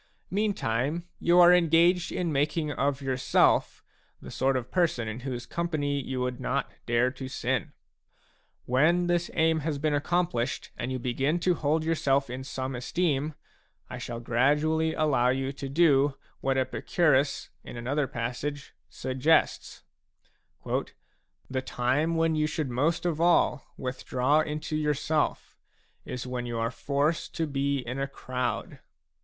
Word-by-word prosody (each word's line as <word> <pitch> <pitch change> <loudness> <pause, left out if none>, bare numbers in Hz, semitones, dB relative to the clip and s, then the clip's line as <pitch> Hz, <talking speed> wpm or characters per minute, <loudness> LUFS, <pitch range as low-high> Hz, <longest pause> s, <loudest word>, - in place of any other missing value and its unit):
Meantime, 170 - -1
you 175 +1 +4
are 175 0 +8
engaged 175 +1 +4
in 175 -3 -1
making 150 +2 0
of 140 -1 -1
yourself 130 -1 +2 0.4
the - - -10
sort 135 0 +1
of 125 -1 -6
person 165 -11 +1
in 110 +2 -4
whose 125 -2 -5
company 145 -4 -1
you 130 0 -4
would 125 -1 -2
not - - -2 0.2
dare 120 +2 +2
to 130 0 -7
sin. 130 -2 -2 0.9
When 160 +8 +3
this 175 -1 0
aim 160 0 +3
has 155 -1 -2
been 150 +1 0
accomplished 145 -5 -1
and 125 - -4
you 130 - -1
begin 135 +6 0
to 180 +1 +3
hold 155 0 0
yourself 140 -5 +1
in 130 +1 -5
some 130 0 -4
esteem, 145 +3 -1 0.6
I - - -5
shall 120 -1 -5
gradually 150 +7 +1
allow 135 -5 +2
you 135 +1 0
to 140 0 -6
do 140 -2 +4 0.2
what 135 0 0
Epicurus, 140 +1 +1
in - - -9
another 135 +4 -1
passage, 125 +5 -4 0.2
suggests: 135 +5 0 0.8
b - - 0 0.3
" - - -42
The 130 0 -1
time 130 +6 0
when 165 0 +2
you 155 -1 +1
should 155 -4 -3
most 150 +9 0
of 165 -2 0
all 170 -4 +3
withdraw 130 +2 0
into 155 0 -2
yourself 150 0 -1 0.5
is 125 - -5
when 125 -1 -4
you 120 -1 -3
are 115 +1 -1
forced 140 +7 -1
to 165 - 0
be 140 -1 0
in 125 +3 -4
a 135 - -1
crowd." 135 +4 -4
140 Hz, 150 wpm, -28 LUFS, 130-160 Hz, 0.9 s, are